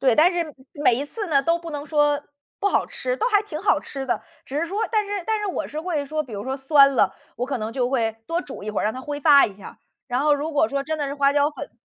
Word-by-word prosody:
对， 255 -4 +3
但 345 +4 +6
是 335 -4 -2 0.3
每 250 - +5
一 265 +4 -2
次 415 +8 -5
呢 285 -5 +3
都 335 +3 +2
不 335 -1 -8
能 290 -1 -5
说 295 -1 +2 0.4
不 405 - 0
好 - - +1
吃， - - -3
都 455 - 0
还 415 -2 +3
挺 320 -7 -6
好 410 - +4
吃 270 -1 -6
的。 250 - -1 0.2
只 280 - -4
是 335 - 0
说 395 +5 -3
但 430 -2 +2
是 405 -2 -3
但 440 -1 +1
是 420 - -3
我 375 - -3
是 305 - -5
会 320 -4 -2
说 310 +2 -1
比 250 - -12
如 200 -1 -4
说 265 +3 -3
酸 275 0 +5
了， - - +3 0.2
我 245 - -2
可 270 -2 -2
能 220 0 -4
就 245 0 0
会 225 -4 0
多 335 +1 -1
煮 275 - -9
一 215 - -3
会 210 - -1
儿， - - -1
让 215 - +1
它 255 - -6
挥 290 +1 -5
发 285 -1 +7
一 205 - -9
下。 200 - -12 0.3
然 250 0 0
后 295 +1 +4
如 295 +3 -3
果 315 +2 +3
说 280 0 -1
真 315 +2 -3
的 290 - -1
是 280 - -4
花 280 -1 +3
椒 290 +1 +3
粉 295 - -8
290 Hz, 320 characters per minute, -23 LUFS, 270-335 Hz, 0.4 s, 发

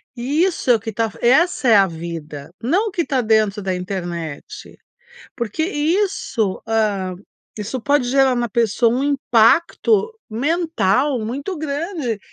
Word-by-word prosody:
e 275 +7 0
isso 365 -8 -1
é - - +6
o - - -1
que 225 +1 -6
tá 225 +1 -1
essa 270 +3 +3
é 225 - +6
a 200 -1 +6
vida. 160 -4 -7
Não 360 - +1
o - - -4
que 345 -2 -1
tá 265 - 0
dentro 215 -2 +2
da 190 -1 -2
internet. 175 -5 -6 0.6
Porque 235 +5 -2
isso, 315 - -1
hã, 210 -4 0 0.4
isso 220 +5 -4
pode 285 +1 +1
gerar 270 0 +4
na 240 -1 -1
pessoa 230 +1 +2
um 255 +3 0
impacto 290 - +2 0.2
mental 280 - 0
muito 270 - -4
grande, 300 - -3
240 Hz, 145 wpm, -20 LUFS, 205-295 Hz, 0.6 s, é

